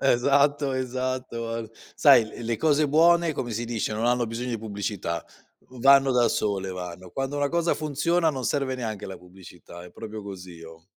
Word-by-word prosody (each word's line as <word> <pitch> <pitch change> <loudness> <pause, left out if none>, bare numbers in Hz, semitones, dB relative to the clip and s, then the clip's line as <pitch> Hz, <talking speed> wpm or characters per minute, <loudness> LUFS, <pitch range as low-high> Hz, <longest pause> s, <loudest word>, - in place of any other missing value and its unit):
Esatto, 140 +2 +3
esatto, 130 -2 -3
ar 115 -1 -5 0.2
Sai 115 - +6 0.2
l - - -6
le 115 -1 -1
cose 155 -1 +3
buone, 170 +2 +4
come 120 -3 -4
si 115 +2 -3
dice, 115 -2 -2
non 110 +2 -2
hanno 120 -1 +2
bisogno 120 +3 -4
di 115 - -2
pubblicità, 100 -5 -4 0.4
v 130 - -13
vanno 135 0 +6
da 120 -2 +3
sole, 100 -3 -1
vanno. 90 0 -7
Quando 135 +1 -3
una 145 0 +1
cosa 170 +1 +1
funziona 155 +3 0
non 130 -4 -3
serve 135 -1 0
neanche 110 -5 -5
la 95 - -7
pubblicità, 90 -1 -13
è 90 - -12
proprio 110 -1 -8
così 90 -4 -9
oh. 80 0 -13
120 Hz, 185 wpm, -25 LUFS, 100-140 Hz, 0.4 s, Sai